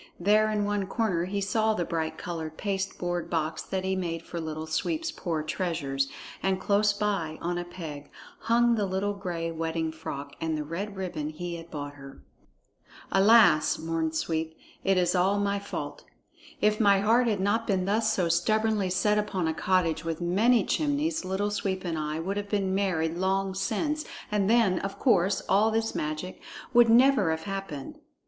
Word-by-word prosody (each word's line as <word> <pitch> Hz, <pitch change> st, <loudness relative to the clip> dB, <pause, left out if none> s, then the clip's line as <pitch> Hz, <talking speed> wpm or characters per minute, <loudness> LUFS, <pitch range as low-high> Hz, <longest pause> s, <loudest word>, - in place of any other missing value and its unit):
There 210 Hz, +4 st, +4 dB
in 210 Hz, -1 st, 0 dB
one 205 Hz, -1 st, -1 dB
corner 195 Hz, -6 st, 0 dB
he 200 Hz, +2 st, -2 dB
saw 220 Hz, +2 st, +1 dB
the 175 Hz, -, -1 dB
bright 160 Hz, -1 st, -2 dB
colored 160 Hz, -2 st, -5 dB
pasteboard 190 Hz, -3 st, -2 dB
box 160 Hz, -1 st, -1 dB
that 190 Hz, -1 st, -3 dB
he 190 Hz, -, -1 dB
had 190 Hz, -, 0 dB
made 165 Hz, -2 st, -3 dB
for 170 Hz, 0 st, -6 dB
Little 155 Hz, 0 st, -4 dB
Sweep's 315 Hz, -, -1 dB
poor 160 Hz, -4 st, -3 dB
treasures, 155 Hz, -5 st, -1 dB, 0.3 s
and 190 Hz, -1 st, +1 dB
close 205 Hz, +2 st, +3 dB
by, 200 Hz, -7 st, -2 dB
on 175 Hz, +1 st, -2 dB
a -, -, -3 dB
peg, 155 Hz, -5 st, -8 dB, 0.3 s
hung 235 Hz, +1 st, +3 dB
the 210 Hz, -3 st, 0 dB
little 190 Hz, +2 st, -1 dB
gray 175 Hz, -4 st, -4 dB
wedding 160 Hz, 0 st, -2 dB
frock 140 Hz, -3 st, -7 dB
and 160 Hz, -1 st, -1 dB
the 150 Hz, -, -2 dB
red 190 Hz, +7 st, -5 dB
ribbon 175 Hz, -6 st, -3 dB
he 170 Hz, +3 st, -5 dB
had 165 Hz, 0 st, -11 dB
bought 145 Hz, -2 st, -6 dB
her. 135 Hz, -1 st, -13 dB, 0.9 s
"Alas!" 195 Hz, -6 st, +5 dB
mourned 160 Hz, 0 st, -2 dB
Sweep, 160 Hz, 0 st, -2 dB, 0.3 s
"it 195 Hz, -1 st, +3 dB
is 180 Hz, -1 st, +2 dB
all 190 Hz, +2 st, +2 dB
my 200 Hz, 0 st, 0 dB
fault! 200 Hz, -, -6 dB, 0.6 s
If 210 Hz, 0 st, +3 dB
my 200 Hz, -3 st, +5 dB
heart 235 Hz, +4 st, +4 dB
had 210 Hz, -4 st, +1 dB
not 205 Hz, +4 st, +1 dB
been 190 Hz, -3 st, +1 dB
thus 215 Hz, +2 st, +2 dB
so 180 Hz, -5 st, +1 dB
stubbornly 210 Hz, +3 st, +1 dB
set 210 Hz, +3 st, +2 dB
upon 195 Hz, -5 st, -1 dB
a 160 Hz, -, 0 dB
cottage 165 Hz, -2 st, +1 dB
with 165 Hz, -1 st, -3 dB
many 205 Hz, +7 st, +3 dB
chimneys, 305 Hz, 0 st, 0 dB
Little 190 Hz, +3 st, -1 dB
Sweep 190 Hz, -2 st, -2 dB
and 170 Hz, -2 st, -1 dB
I 155 Hz, +1 st, -2 dB
would 195 Hz, +5 st, -3 dB
have 205 Hz, 0 st, -4 dB
been 195 Hz, -2 st, 0 dB
married 170 Hz, -4 st, 0 dB
long 190 Hz, +1 st, 0 dB
since, 295 Hz, -, -1 dB, 0.3 s
and 205 Hz, -1 st, +1 dB
then, 220 Hz, -6 st, +4 dB
of 195 Hz, 0 st, -5 dB
course, 195 Hz, -6 st, +2 dB
all 210 Hz, +3 st, +4 dB
this 225 Hz, 0 st, 0 dB
magic 155 Hz, +4 st, -4 dB, 0.3 s
would 240 Hz, -1 st, +6 dB
never 245 Hz, -5 st, +5 dB
have 160 Hz, 0 st, -1 dB
happened." 195 Hz, -9 st, -6 dB
190 Hz, 180 wpm, -28 LUFS, 165-205 Hz, 0.9 s, would